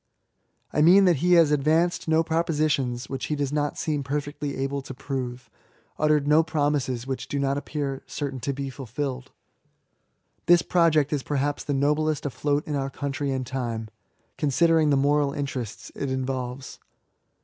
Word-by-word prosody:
I 150 - +2
mean 185 +5 +7
that 175 -4 +4
he 180 +6 +3
has 165 -4 +6
advanced 160 +5 +2
no 160 +1 +3
propositions 155 -6 0
which 135 -1 -4
he 150 - -1
does 140 -1 -2
not 145 -1 -1
seem 150 -4 -1
perfectly 145 +1 -3
able 135 +1 -2
to 135 -1 -9
prove, 125 -2 -5 0.5
uttered 150 -1 +2
no 150 +2 +6
promises 145 -6 -1
which 135 -1 -4
do 145 - -3
not 140 0 +1
appear 140 -1 -3
certain 140 -3 -4
to 140 - -2
be 135 0 -4
fulfilled. 130 0 -5 1.2
This 175 -1 +6
project 155 -4 +3
is 145 - 0
perhaps 145 +1 -1
the 145 - -1
noblest 150 +2 +1
afloat 145 +1 -1
in 150 - -2
our 135 -1 -1
country 140 0 -3
and 130 -1 -2
time, 115 -4 -4 0.5
considering 160 +2 +3
the 140 - +4
moral 145 0 +2
interests 135 -6 -5
it 140 - -3
involves. 130 0 -4
145 Hz, 160 wpm, -25 LUFS, 135-150 Hz, 1.2 s, mean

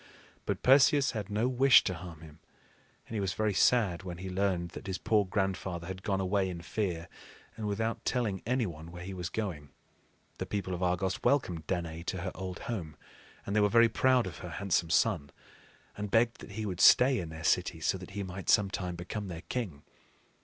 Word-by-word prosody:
But - - -2
Perseus 140 +1 +5
had 105 -4 -5
no 105 +4 +1
wish 130 +1 +6
to 95 - -1
harm 85 -2 -9
him; 80 -1 -13 0.7
and - - -11
he 110 - -1
was 95 -2 -1
very 110 -1 +1
sad 100 -4 +3
when 90 -3 -7
he 95 +1 -6
learned 90 -2 0
that - - -9
his 95 -1 -2
poor 105 -2 +2
grandfather 95 -3 -2
had 95 +1 -6
gone 95 -1 -1
away 95 0 +1
in 85 -2 -6
fear 85 -4 -2 0.5
and 110 -2 -4
without 110 +2 -2
telling 110 -7 -1
any 125 +1 0
one 80 -3 -7
where 90 0 -8
he 95 +2 -6
was 90 -2 -4
going. 90 -11 -4 0.7
The - - -3
people 95 -3 -3
of 90 - -4
Argos 90 +1 0
welcomed 90 - +1
Danaë 85 -2 -3
to 95 - -2
her 95 - -3
old 95 -1 -6
home; 85 -10 -5 0.5
and 100 - -3
they - - +4
were 105 - +4
very 115 +1 +5
proud 130 +1 +3
of 90 -4 -7
her 90 - -7
handsome 85 -1 0
son, 85 -7 +2 0.7
and 105 0 -4
begged 115 +3 +2
that 100 - -10
he 110 +1 -4
would 95 -3 -3
stay 130 0 +7
in 85 - -5
their 80 0 -8
city, 85 0 +1
so 95 +4 0
that 90 - -10
he 100 - -1
might 95 0 -6
some 100 -3 +4
time 90 -3 -3
become 95 +4 -5
their 85 -2 -7
king. 95 - -4
95 Hz, 210 wpm, -31 LUFS, 85-110 Hz, 0.7 s, stay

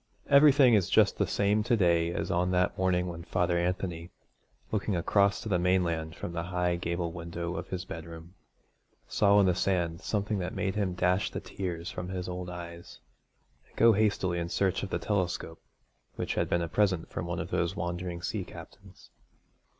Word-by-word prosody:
Everything 140 -3 +7
is 100 -5 +3
just - - +4
the - - +2
same 105 +1 +2
to 120 +2 +1
day 85 -3 +3
as - - -3
on 90 +1 +1
that 90 0 +1
morning 90 -1 +1
when 85 -2 -6
Father 85 +1 0
Anthony, 85 -1 -2 0.6
looking 105 -2 -1
across 100 +3 +2
to - - -6
the 95 -4 +1
mainland 85 -3 0
from 85 - -6
the 85 - -2
high 90 -1 0
gable 85 0 -2
window 85 +1 -5
of - - -5
his 90 -1 -5
bedroom, 80 0 -9 0.7
saw 100 0 +4
on 100 - +6
the 90 - +3
sands 85 -2 -1
something 105 -1 -1
that 90 - -4
made 95 -2 -1
him 100 -4 -1
dash 90 +2 +1
the - - -5
tears 90 -2 -5
from 90 0 -5
his 90 -1 -4
old 90 0 -5
eyes, 85 -1 -9 0.7
and - - -27
go 115 0 +6
hastily 100 -4 +1
in 85 0 -3
search 95 +1 0
of 100 - -4
the - - -1
telescope 90 -5 -2 0.5
which - - -2
had - - -1
been 85 0 +1
a - - -2
present 95 -2 +1
from - - -4
one - - -3
of - - -5
those 85 +3 0
wandering 85 -1 -4
sea 100 +1 -2
captains. - - -13
90 Hz, 190 wpm, -29 LUFS, 85-100 Hz, 0.7 s, Everything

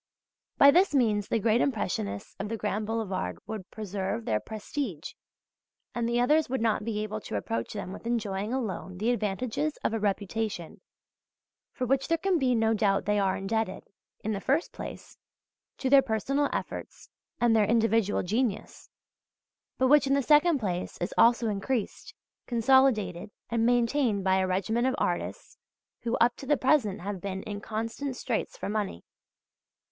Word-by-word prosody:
By 280 - +8
this 355 0 +3
means 215 -6 +2
the - - +1
great 225 +2 +2
Impressionists 140 - -2
of 200 +1 -3
the 225 - -3
Grand 210 0 -2
Boulevard 195 - -2
would 215 -4 -6
preserve 195 - -4
their 105 -1 +1
prestige, 215 - -5 0.8
and 235 -1 -1
the 240 0 +1
others 300 +5 +3
would 265 - -1
not 220 -2 +1
be 210 -1 -2
able 215 0 -4
to - - -6
reproach 115 +3 -3
them 185 - -5
with 230 - -8
enjoying 210 -3 -2
alone 195 -7 -3
the 220 +5 +1
advantages 245 +7 -1
of - - 0
a 225 - 0
reputation 205 -3 -2 0.9
for 255 - -3
which 270 +2 +1
there 330 - +2
can 375 -1 +1
be 255 -3 +2
no 225 0 +2
doubt 200 -3 +1
they 210 0 +2
are 195 -1 +1
indebted, 215 0 -2 0.4
in 220 - -1
the 200 -2 -3
first 290 +6 +1
place, - - -9 0.6
to 265 - -2
their 275 +1 +7
personal 270 +4 0
efforts - - -5 0.3
and 235 -2 +4
their 215 -2 +4
individual 225 -2 +2
genius 215 +2 -2 0.9
but 260 - +3
which 290 +1 +5
in 275 - +3
the 280 - +1
second 300 +3 +5
place 185 -7 -3
is 175 - -3
also 235 0 +4
increased, 215 +3 -3 0.3
consolidated 230 -7 +3 0.2
and 230 0 +2
maintained 240 -3 +2
by 190 0 +3
a 190 0 +1
regiment 220 +7 0
of 260 - +1
artists - - -3 0.4
who 235 0 -1
up 240 +1 +3
to 270 - -9
the 295 - +3
present 255 - +2
have 195 -1 -5
been 190 -1 -4
in 205 -1 -6
constant 230 +6 -4
straits - - -3
for - - -5
money. 205 - -3
225 Hz, 165 wpm, -28 LUFS, 200-255 Hz, 0.9 s, By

